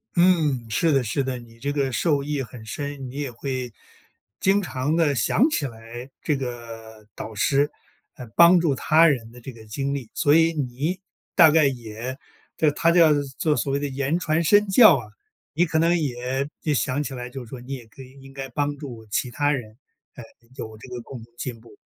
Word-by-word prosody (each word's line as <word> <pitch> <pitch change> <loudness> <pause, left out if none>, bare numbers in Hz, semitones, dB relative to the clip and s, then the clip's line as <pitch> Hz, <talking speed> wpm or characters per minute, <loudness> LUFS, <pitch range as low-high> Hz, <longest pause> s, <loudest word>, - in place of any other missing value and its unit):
嗯， 160 -9 +3
是 160 +10 +2
的 135 -3 +3
是 125 +5 -1
的， 130 -1 -3
你 115 -1 -15
这 140 +4 -3
个 140 -2 0
受 145 +4 +1
益 145 -1 -2
很 120 -2 -11
深。 140 +2 -5
你 125 - -11
也 140 -3 -3
会 125 -1 -4 0.7
经 195 +2 +3
常 145 -2 -2
地 160 -4 +2
想 135 - +3
起 230 - -1
来， 115 0 -8
这 150 -3 0
个 115 -4 -8
导 110 - -7
师 140 +7 +2 0.4
来 125 - -9
帮 170 +1 +7
助 160 -5 +1
他 160 +5 +5
人 120 -7 0
的 125 +1 -14
这 130 - -8
个 115 -2 -14
经 135 +6 -3
历。 130 -5 -5
所 145 -2 +3
以 165 0 +4
你 145 +5 -2 0.3
大 165 -4 +7
概 155 0 +4
也 120 -1 -4 0.4
叫 155 - +4
他 165 +3 +2
叫 170 -2 +6 0.3
做 155 -2 +2
所 140 - -1
谓 140 - +1
的 145 - -2
言 140 +4 -1
传 165 -1 0
身 205 +5 +4
教 195 - +8
啊， 120 -4 -7 0.5
你 170 +4 +3
可 160 -1 0
能 170 +2 +3
也 130 -1 -2
也 150 -2 0
想 130 +2 0
起 140 -2 -5
来 125 -1 -6
就 130 +1 -8
是 115 - -14
说 130 - -8
你 125 +3 -7
也 125 -4 -8
可 130 +4 -13
以 130 - -15
应 135 0 -13
该 135 0 -6
帮 145 +3 -2
助 120 -6 -9
其 120 +4 -2
他 145 +3 +1
人， 115 -6 -4 0.4
呃， 120 - -9 0.3
有 110 -4 -7
这 115 - -12
个 125 -1 -6
共 120 -1 -10
同 115 +1 -19
进 120 -3 -5
步。 110 -2 -17
135 Hz, 225 characters per minute, -24 LUFS, 120-150 Hz, 0.7 s, 教